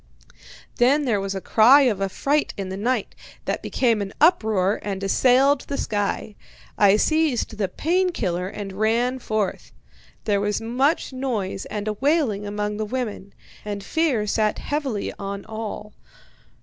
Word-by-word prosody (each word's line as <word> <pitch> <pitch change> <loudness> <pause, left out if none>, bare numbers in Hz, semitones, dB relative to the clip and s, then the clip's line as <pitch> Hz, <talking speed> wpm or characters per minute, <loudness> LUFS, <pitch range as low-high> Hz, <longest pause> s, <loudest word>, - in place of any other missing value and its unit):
Then 280 +5 +3
there 220 -6 +1
was 195 0 -3
a - - -2
cry 245 +9 +6
of 225 -8 +1
affright 275 +10 0
in 195 -2 -4
the 190 - -4
night, 225 +2 -1 0.3
that - - -2
became 230 -5 +1
an 195 0 -5
uproar 215 - +3
and 195 -1 -4
assailed 265 +7 +4
the 280 - -3
sky. 210 0 -2 0.4
I 205 0 +5
seized 295 -6 +1
the 200 - +1
'pain 360 - 0
killer' 180 - -2
and 195 0 -6
ran 230 +5 +1
forth. 215 -4 -2 0.5
There 205 -2 +1
was 205 0 0
much 260 +6 0
noise, 235 -8 -3
and 210 0 -5
a 215 - 0
wailing 255 -5 0
among 210 0 -3
the 215 - -2
women, 210 -4 -5 0.3
and 205 -1 -5
fear 270 -4 0
sat 215 +1 +1
heavily 275 -8 -3
on 200 0 -5
all. 215 -1 -6
215 Hz, 150 wpm, -23 LUFS, 200-260 Hz, 0.5 s, cry